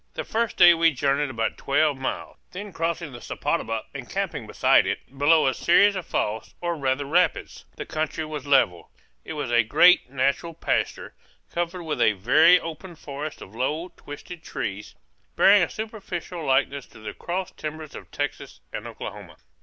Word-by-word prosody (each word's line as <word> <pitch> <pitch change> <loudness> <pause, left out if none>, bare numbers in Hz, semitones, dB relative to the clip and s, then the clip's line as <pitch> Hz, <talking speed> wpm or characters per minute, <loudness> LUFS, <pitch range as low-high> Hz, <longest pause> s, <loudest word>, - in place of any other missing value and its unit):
The - - -3
first 230 0 -2
day 175 0 +9
we 165 0 +4
journeyed 140 +2 +1
about 115 -3 -2
twelve 145 +1 +2
miles, 130 0 -5 0.2
then 200 +1 -7
crossing 165 -1 -2
the 120 - -10
Sepotuba 115 0 -2
and - - -8
camping - - -3
beside - - +4
it, 135 - -5
below 150 +3 +4
a 135 - +2
series 200 +8 +4
of 185 -3 -5
falls, 110 +1 -2
or 175 -1 -2
rather 140 -1 -1
rapids. 175 +6 0
The - - -6
country 155 0 -3
was 150 -2 -6
level. 90 -12 +2 0.3
It - - -6
was 145 -5 -4
a 120 0 +5
great 125 +7 +5
natural 140 +5 -1
pasture, - - -2 0.4
covered 175 +1 -3
with 155 -2 -3
a 110 - +5
very 155 - +5
open 165 +2 -8
forest 150 0 -7
of 95 - -14
low, 150 +9 -2
twisted 160 +4 -10
trees, 100 +1 -5 0.4
bearing 200 +1 +6
a 175 - +1
superficial 190 -6 -6
likeness 135 0 +1
to - - -16
the 110 - -7
cross 180 +1 -4
timbers 155 -1 -7
of - - -10
Texas - - -5
and - - -5
Oklahoma. - - -8
155 Hz, 170 wpm, -25 LUFS, 135-175 Hz, 0.4 s, day